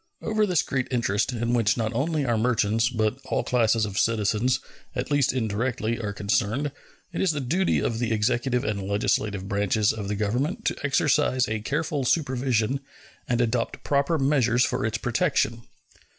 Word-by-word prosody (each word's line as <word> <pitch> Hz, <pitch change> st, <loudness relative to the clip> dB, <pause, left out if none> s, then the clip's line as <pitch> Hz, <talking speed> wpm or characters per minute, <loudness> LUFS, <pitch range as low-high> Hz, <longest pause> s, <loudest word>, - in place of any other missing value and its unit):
Over 215 Hz, -1 st, +1 dB
this 180 Hz, -5 st, +2 dB
great 130 Hz, -2 st, -2 dB
interest, 115 Hz, -3 st, 0 dB
in 120 Hz, 0 st, -1 dB
which 115 Hz, -2 st, +2 dB
not 110 Hz, 0 st, -1 dB
only 145 Hz, +4 st, 0 dB
our 120 Hz, -2 st, +1 dB
merchants, 115 Hz, -1 st, +2 dB
but 110 Hz, 0 st, -1 dB
all -, -, -1 dB
classes 115 Hz, -2 st, +2 dB
of 100 Hz, -2 st, -3 dB
citizens, 115 Hz, +2 st, +1 dB, 0.4 s
at 130 Hz, +3 st, -3 dB
least 145 Hz, -2 st, +3 dB
indirectly, 115 Hz, 0 st, -1 dB
are 105 Hz, -3 st, -3 dB
concerned, 105 Hz, +7 st, 0 dB, 0.4 s
it -, -, -2 dB
is 185 Hz, -4 st, +2 dB
the 150 Hz, -, -2 dB
duty 170 Hz, +8 st, +1 dB
of 115 Hz, -1 st, -1 dB
the 120 Hz, -2 st, -1 dB
executive 120 Hz, +3 st, +1 dB
and 100 Hz, -2 st, -2 dB
legislative 100 Hz, 0 st, -1 dB
branches 100 Hz, +1 st, +1 dB
of 105 Hz, -3 st, -5 dB
the 105 Hz, -, -2 dB
Government 130 Hz, -, -1 dB
to -, -, +1 dB
exercise 140 Hz, -2 st, +2 dB
a 110 Hz, 0 st, -2 dB
careful 150 Hz, +4 st, -2 dB
supervision 130 Hz, -3 st, +1 dB, 0.5 s
and 120 Hz, 0 st, +2 dB
adopt 120 Hz, 0 st, -1 dB
proper 140 Hz, +3 st, +1 dB
measures 130 Hz, -4 st, +3 dB
for -, -, -1 dB
its 110 Hz, 0 st, -2 dB
protection. 120 Hz, -, 0 dB
120 Hz, 165 wpm, -25 LUFS, 110-135 Hz, 0.5 s, least